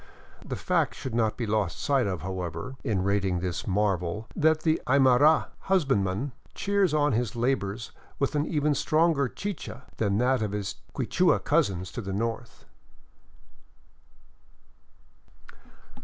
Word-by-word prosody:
The - - -4
fact - - 0
should 130 -3 -6
not 110 -2 +1
be 120 - -2
lost 105 -5 0
sight 135 -6 +2
of, 90 -5 -3
however, 90 +5 -4
in 95 -4 0
rating 100 -2 +1
this 90 -2 -3
marvel 100 0 0
that 160 0 +3
the 160 -1 +1
Aymara 140 +3 +5
hus 190 -4 +1
bandman 105 +1 0 0.2
cheers 200 -3 +1
on 150 -1 +2
his 120 0 -1
labors 115 -3 -1 0.3
with 140 - 0
an 150 +1 0
even 150 -2 +1
stronger 155 0 +2
chicha 155 - -6
than 100 -2 +1
that 125 +1 +2
of 105 -2 -2
his 100 -2 -3 0.2
Quichua - - +2
cousins 90 -2 +1
to 120 - -5
the 95 -2 -5
north. 115 +3 -4
115 Hz, 135 wpm, -27 LUFS, 100-145 Hz, 0.3 s, Aymara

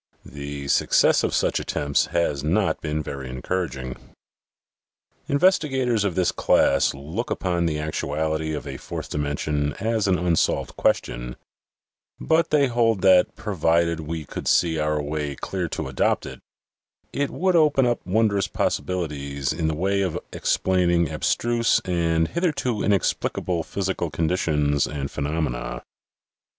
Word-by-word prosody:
The 70 0 -7
success - - +3
of - - 0
such - - +1
attempts 70 -1 0
has 75 -5 0
not 95 +6 +1
been 75 -1 -2
very 70 -2 -6
encouraging. 65 -2 -3 1.3
Investigators 135 - +2
of 100 -4 -1
this 90 -1 +2
class 70 - +3
look 80 - -5
upon 85 -2 0
the 75 -2 -1
actuality 80 +1 -2
of 75 - -6
a 70 -2 -6
fourth - - -7
dimension 75 0 -1
as 110 +2 -1
an 95 -1 +3
unsolved 90 -2 0
question, - - -1 0.8
but 165 +1 +2
they 150 -2 +4
hold 115 -5 +1
that, 95 -2 +5
provided 85 -4 +1
we 80 0 -5
could - - -6
see 80 -2 +3
our 75 0 0
way 75 -1 -3
clear 90 +3 -3
to 80 -2 -4
adopt 65 -1 0
it, - - -8 0.7
it 140 0 0
would 185 0 0
open 150 -5 +4
up 120 -1 0
wondrous 100 0 +1
possibilities 70 -6 -2
in 80 -2 -1
the 80 - 0
way 100 +4 0
of 95 -4 -1 0.2
explain 90 -2 +1
ing 85 -2 +2
abstruse 115 - +1
and 85 -2 +1
hitherto 150 - -1
inexplicable 90 -2 0
physical 95 -1 -2
conditions 75 -2 +1
and 70 -2 -4
phenomena. - - -3
85 Hz, 135 wpm, -24 LUFS, 75-100 Hz, 1.3 s, that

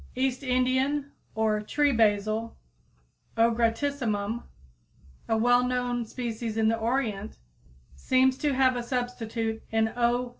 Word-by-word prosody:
East 260 0 0
Indian, 260 +2 0 0.2
or 215 -1 +1
Tree 290 +7 +1
Basil 215 0 +1 0.8
(O. 230 +1 +4
gratissimum, 230 -2 0
Linn.), 235 +1 -4 0.9
a 225 - +2
well 245 +2 +4
known 245 -1 -1
species 230 -1 -4
in 220 0 +3
the 225 - +2
Orient, 220 -3 -2 0.6
seems 260 - +2
to 290 -3 0
have 260 -1 +3
a 245 - -2
substitute 230 -2 -3
in 220 0 +1
_O. 245 +1 +1
240 Hz, 125 wpm, -27 LUFS, 220-255 Hz, 0.9 s, O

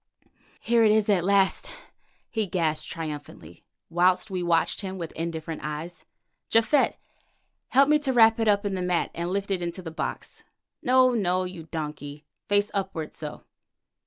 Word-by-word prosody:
"Here 235 -1 +3
it 215 - +5
is 215 -1 +3
at 190 -4 +3
last," 195 0 +2 0.6
he 220 -3 -1
gasped 160 -4 -1
triumphantly, 145 - -7 0.2
whilst 180 +4 +2
we 185 -1 -2
watched 170 -1 +1
him 190 -1 -5
with 170 -3 -5
indifferent 165 -1 -5
eyes. 150 +4 -6 0.4
"Japhet, 230 +6 +3 0.7
help 275 +2 +4
me 300 0 +4
to 285 -3 -1
wrap 225 -2 +5
it 225 - +1
up 205 0 +3
in 200 - -1
the 185 - -2
mat 180 -1 0
and 170 +1 -3
lift 200 +1 -2
it 185 -2 0
into 175 +2 -4
the 165 - -6
box. 160 - -5 0.4
No, 255 0 +4
no, 185 -5 +1
you 180 -3 -7
donkey—face 150 +6 -3
upward—so. 160 -6 -5
180 Hz, 155 wpm, -26 LUFS, 165-205 Hz, 0.7 s, it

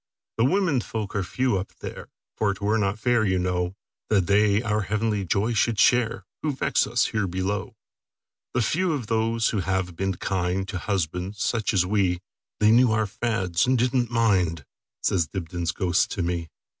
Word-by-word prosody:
"The 115 - +3
women 165 -4 +2
folk 110 -3 -5
are 100 - +1
few 120 +2 0
up 95 - -8
there; - - -8 0.3
For 105 -2 +1
't 100 - -6
were 110 +2 +2
not 100 0 0
fair, 120 0 +2
you 95 -3 +1
know, 90 0 -1 0.3
That 100 -4 +3
they 105 +3 +3
our 105 -1 0
heavenly 105 0 -1
joy 105 +7 +1
should 115 +1 +2
shareWho 115 +1 +3 0.3
vex - - +1
us 120 +2 +2
here 105 -3 -1
below. 95 +2 -3 0.8
The 120 - +2
few 175 - +1
are 130 -5 -4
those 115 +1 +1
who 110 - -1
have 95 -1 -1
been 95 +1 -1
kindTo 95 +2 -2
husbands 95 +1 -2
such 115 -3 0
as 95 -4 +2
we; 95 -3 +1 0.4
They 105 0 +5
knew 120 0 +5
our 110 0 +2
fads, 95 -3 0
and 130 0 +3
did 125 +2 +1
n't 120 -3 +2
mind,"Says 90 - 0
Dibdin's 85 -1 -3
ghost 90 -2 +1
to 95 - -2
me. 85 -1 -2
105 Hz, 175 wpm, -25 LUFS, 90-115 Hz, 0.8 s, They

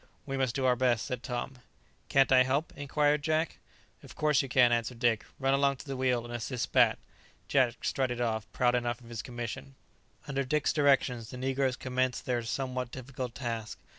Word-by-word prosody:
"We 135 - -3
must 130 -3 0
do 135 - 0
our 125 -1 +4
best," 120 -3 +1
said 125 -2 -4
Tom. 125 +1 -4 0.5
"Can't 135 0 +4
I 130 -1 +7
help?" 135 +5 0
inquired 145 +1 +1
Jack. 155 +2 0 0.4
"Of - - -13
course 150 -2 +3
you 135 - -6
can," 125 -2 +5
answered 120 +1 0
Dick; 115 -2 +2
"run 135 0 +1
along 140 0 +3
to - - -11
the 135 -2 -4
wheel, 125 -2 +1
and 120 - -8
assist 120 +1 -3
Bat." - - +5 0.5
Jack 125 -4 +2
strutted 125 -3 0
off, 110 -2 -2
proud 125 -1 +2
enough 120 -1 -1
of 115 - -14
his 115 -3 -4
commission. 120 +4 -6 0.5
Under 140 -1 -1
Dick's 145 +2 +1
directions, 135 -6 +2
the 125 - -8
negroes 130 0 0
commenced 130 -2 -1
their 125 -2 0
somewhat 125 +1 -3
difficult 130 -1 -6
task. 115 -4 -4
130 Hz, 190 wpm, -30 LUFS, 120-135 Hz, 0.5 s, I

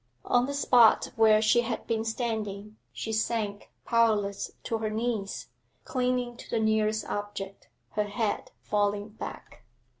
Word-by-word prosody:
On 245 +1 +3
the 280 - -3
spot 245 -5 +5
where 220 -1 +5
she 240 +2 +5
had 235 -1 -3
been 225 -1 0
standing 215 -3 -3 0.2
she 220 - -4
sank 215 -2 -1 0.2
powerless 215 -4 +2
to 225 - -2
her 220 -1 -1
knees, 220 -2 -2 0.3
clinging 250 -2 -1
to - - -12
the 230 - 0
nearest 220 0 +1
object, 205 -1 -5 0.2
her 210 - 0
head 205 +1 -2
falling 205 0 0
back. 215 - -9
220 Hz, 140 wpm, -28 LUFS, 205-230 Hz, 0.3 s, spot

